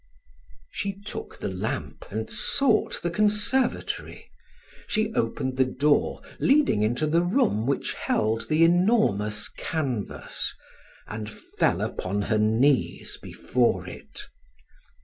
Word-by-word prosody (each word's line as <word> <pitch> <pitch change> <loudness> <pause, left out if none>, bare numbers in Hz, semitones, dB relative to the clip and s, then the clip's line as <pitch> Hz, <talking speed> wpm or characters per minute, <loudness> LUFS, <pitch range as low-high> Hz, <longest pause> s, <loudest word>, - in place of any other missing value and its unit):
She 200 -1 -4
took 205 - -7
the - - -4
lamp - - -4
and - - -3
sought 280 - +2
the 175 - 0
conservatory; 210 +6 0 0.6
she 215 0 0
opened 130 - -1
the 130 - +4
door 145 +3 +1 0.2
leading 280 - +3
into 120 +8 +1
the 165 +3 +3
room 175 - +1
which 140 - -1
held 110 +1 -1
the 155 +1 +4
enormous 165 - +3
canvas, 135 -10 -3 0.5
and 105 -1 -6
fell - - -1
upon 100 +2 -2
her 105 +1 +1
knees 115 +6 +1
before 125 -2 0
it. - - -9
150 Hz, 110 wpm, -26 LUFS, -, 0.6 s, the